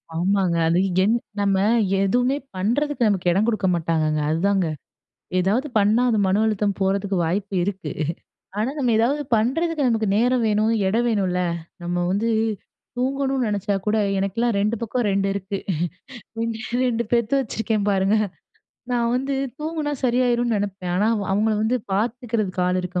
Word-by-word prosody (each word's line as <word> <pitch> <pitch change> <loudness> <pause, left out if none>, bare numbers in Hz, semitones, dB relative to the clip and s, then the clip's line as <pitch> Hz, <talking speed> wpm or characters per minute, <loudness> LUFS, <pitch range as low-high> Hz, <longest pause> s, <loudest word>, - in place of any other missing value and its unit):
ஆமாங்க. 185 0 +1
அது 170 +2 +3 0.2
என் 215 - +3 0.3
நம்ம 200 -1 +2 0.4
எதுவுமே 245 +7 +2 0.2
பண்ணுறதுக்கு 240 +6 +1
நமக்கு 185 -3 +1
இடம் 200 +5 +2
குடுக்க 215 -5 +1
மாட்டாங்கங்க, 155 -2 0
அதுதாங்க. 185 +2 +1 0.7
ஏதாவது 215 +11 +1
பண்ணா, 210 +4 +3
அது 220 - +1
மன 200 +3 +2
அழுத்தம் 210 -2 0
போறதுக்கு 195 0 0
வாய்ப்பு 195 +4 -2
இருக்கு. 190 -6 -4 0.7
ஆனா 225 +5 0
நம்ம 250 -3 +1
ஏதாவது 260 +7 +2
பண்ணுறதுக்கு 290 +6 +1
நமக்கு 225 -3 +1
நேரம் 245 +2 +2
வேணும், 215 +1 +2
இடம் 230 +5 +1
வேணும்ல்ல. 185 -4 0 0.4
நம்ம 175 0 -1
வந்து 215 +4 0 0.7
தூங்கணும்னு 265 0 0
நெனைச்சா 205 -1 -1
கூட, 215 - +2 0.2
எனக்கெல்லாம் 215 +4 0
2 215 +3 +1
பக்கம் 230 0 -1
2 195 0 +1
இருக்கு. 195 0 -4 0.8
2 230 -1 -2 0.3
2 235 -2 0
பெத்து 235 +1 +1
வச்சுருக்கேன் 220 -3 -2
பாருங்க. 195 +2 +2 0.8
நான் 235 -1 +1
வந்து 270 +2 -1 0.2
தூங்குனா 305 -1 -3
சரியாயிரும்ன்னு 240 -2 +2
நெனைப்பேன். 195 -3 -3
ஆனா 205 +3 +2
அவ் 205 -2 -2
அவங்கள 215 +2 +2
வந்து 240 +3 +1 0.2
பார்த்துக்கிறதுக்கு 215 -3 -1
ஆள் 180 0 +1
இருக்க 180 0 -3
215 Hz, 145 wpm, -23 LUFS, 195-240 Hz, 0.8 s, அது